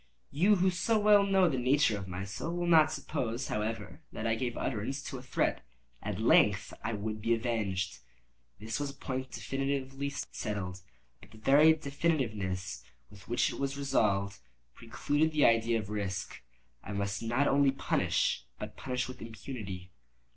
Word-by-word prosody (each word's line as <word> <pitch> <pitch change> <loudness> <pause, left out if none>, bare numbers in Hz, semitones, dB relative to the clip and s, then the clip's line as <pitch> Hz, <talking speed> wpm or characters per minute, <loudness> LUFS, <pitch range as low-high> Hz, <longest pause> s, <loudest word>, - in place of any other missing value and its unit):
You, 185 +9 +4
who 185 0 +3
so 220 +5 +1
well 210 -1 +6
know 195 -2 +4
the 135 -6 0
nature 130 -2 +3
of 100 -2 -6
my 90 +1 -5
soul, 110 - -4
will 175 - -1
not 160 -2 +6
suppose, 135 -5 -3
however, 110 +1 -3
that 110 - -5
I 115 - +2
gave 120 +1 -2
utterance 130 +3 -2
to 135 -5 -6
a - - -9
threat. 125 - -1 0.4
At 100 -1 -4
length 105 -2 +4
I 110 +1 -1
would 105 +1 -4
be 115 +2 +2
avenged; 105 -6 -2 0.6
this 110 +3 -3
was 145 -1 -2
a 140 - -10
point 130 -1 -4
definitively 135 +4 -2 0.2
settled—but 90 - -7
the 110 - -15
very 145 +8 +6
definitiveness 120 - -2 0.3
with 100 -2 -15
which 120 +1 +1
it - - -7
was 140 0 -2
resolved, 100 -8 +1 0.3
precluded 145 - 0
the 150 - +4
idea 115 0 +4
of 105 -2 -5
risk. 100 -3 -4 0.4
I 105 - -6
must 100 0 -2
not 120 +5 +1
only 140 0 +4
punish, 135 - 0
but - - -7
punish 125 -1 -2
with 130 0 -9
impunity. 105 -5 -7
115 Hz, 160 wpm, -31 LUFS, 105-140 Hz, 0.6 s, well